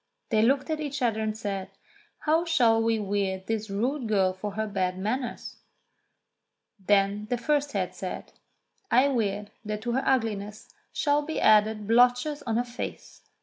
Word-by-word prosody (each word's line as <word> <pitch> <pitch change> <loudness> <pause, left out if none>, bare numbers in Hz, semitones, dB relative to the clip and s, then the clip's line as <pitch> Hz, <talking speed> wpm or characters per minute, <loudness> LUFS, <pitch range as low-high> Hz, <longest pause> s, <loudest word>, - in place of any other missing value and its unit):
They 215 -1 +4
looked 270 +6 +2
at 310 - -1
each 290 -3 -3
other 225 -2 +1
and 215 0 -2
said, 195 -3 -4 0.5
"How 320 +2 +2
shall 240 -10 +3
we 225 0 +2
weird 195 -2 -2
this 220 0 -3
rude 240 +6 -1
girl 195 -3 +2
for 200 +2 -6
her 220 +1 -2
bad 185 -3 -1
manners 235 +6 -3 0.6
.?" - - -56
Then 205 +1 +2
the 245 - 0
first 290 +3 0
head 185 -3 -1
said: 185 -1 -6 0.6
"I 260 +3 +4
weird 210 -5 -1
that 210 0 -4
to 240 - -1
her 265 +3 0
ugliness 215 -5 -1 0.2
shall 290 -1 +1
be 315 +2 -4
added 215 0 +4
blotches 250 +6 +3
on 225 -1 +1
her 240 - +2
face." 245 +1 -7
220 Hz, 165 wpm, -27 LUFS, 205-255 Hz, 0.6 s, They